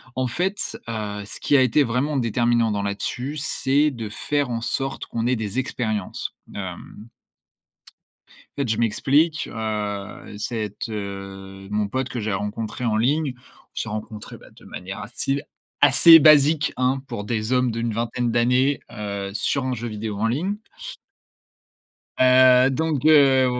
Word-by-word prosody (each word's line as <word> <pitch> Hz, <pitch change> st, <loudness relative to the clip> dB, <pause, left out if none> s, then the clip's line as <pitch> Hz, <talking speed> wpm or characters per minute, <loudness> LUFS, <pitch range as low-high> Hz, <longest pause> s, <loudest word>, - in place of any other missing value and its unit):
en 130 Hz, 0 st, 0 dB
fait, 185 Hz, -, -2 dB
heu, 105 Hz, -2 st, -4 dB
ce -, -, -7 dB
qui 145 Hz, -, +2 dB
a 135 Hz, -, +6 dB
été 130 Hz, +3 st, +3 dB
vraiment 135 Hz, +4 st, -1 dB
déterminant 120 Hz, -1 st, +1 dB
dans 100 Hz, -1 st, -1 dB
là-dessus, 125 Hz, +8 st, -3 dB
c'est 145 Hz, +1 st, +1 dB
de 115 Hz, -5 st, -6 dB
faire 145 Hz, +5 st, -1 dB
en 115 Hz, -, -2 dB
sorte 135 Hz, +3 st, -3 dB
qu'on 115 Hz, 0 st, -3 dB
ait 125 Hz, -1 st, +1 dB
des 110 Hz, +1 st, -4 dB
expériences. 110 Hz, -6 st, -3 dB, 0.2 s
Hem 95 Hz, +3 st, -8 dB, 1.5 s
fait, 140 Hz, -3 st, -1 dB
je 110 Hz, -, 0 dB
m'explique, 140 Hz, +8 st, +1 dB
heu, 105 Hz, -2 st, -5 dB
cette, 105 Hz, -1 st, -4 dB
heu, 95 Hz, -2 st, -7 dB
mon 105 Hz, 0 st, 0 dB
pote 130 Hz, +5 st, -2 dB
que 120 Hz, -, -4 dB
j'ai 105 Hz, -2 st, -2 dB
rencontré 105 Hz, +5 st, -4 dB
en 110 Hz, -2 st, +1 dB
ligne. 140 Hz, +4 st, +1 dB
On 125 Hz, -, -24 dB
s'est 110 Hz, -, -3 dB
rencontré 105 Hz, 0 st, -7 dB
bah -, -, -17 dB
de -, -, -19 dB
manière 95 Hz, +3 st, -7 dB
à 105 Hz, -, -7 dB
style 135 Hz, +4 st, -2 dB, 0.4 s
assez 165 Hz, -1 st, +8 dB
basique 150 Hz, 0 st, +5 dB
hein, 130 Hz, +1 st, +1 dB
pour 105 Hz, -, -5 dB
des 110 Hz, +1 st, -2 dB
hommes 125 Hz, -1 st, +2 dB
d'une 115 Hz, 0 st, -2 dB
vingtaine 120 Hz, +1 st, -1 dB
d'années, 125 Hz, +4 st, +2 dB
heu, 100 Hz, -3 st, -5 dB
sur 135 Hz, +5 st, -1 dB
un 130 Hz, -, -1 dB
jeu 120 Hz, 0 st, -4 dB
vidéo 105 Hz, -1 st, -5 dB
en 115 Hz, -, +1 dB
ligne. 170 Hz, -, -1 dB, 1.6 s
Heu, 130 Hz, 0 st, +6 dB
donc, 150 Hz, 0 st, -1 dB
heu, 140 Hz, -4 st, +6 dB
120 Hz, 155 wpm, -23 LUFS, 105-135 Hz, 1.6 s, assez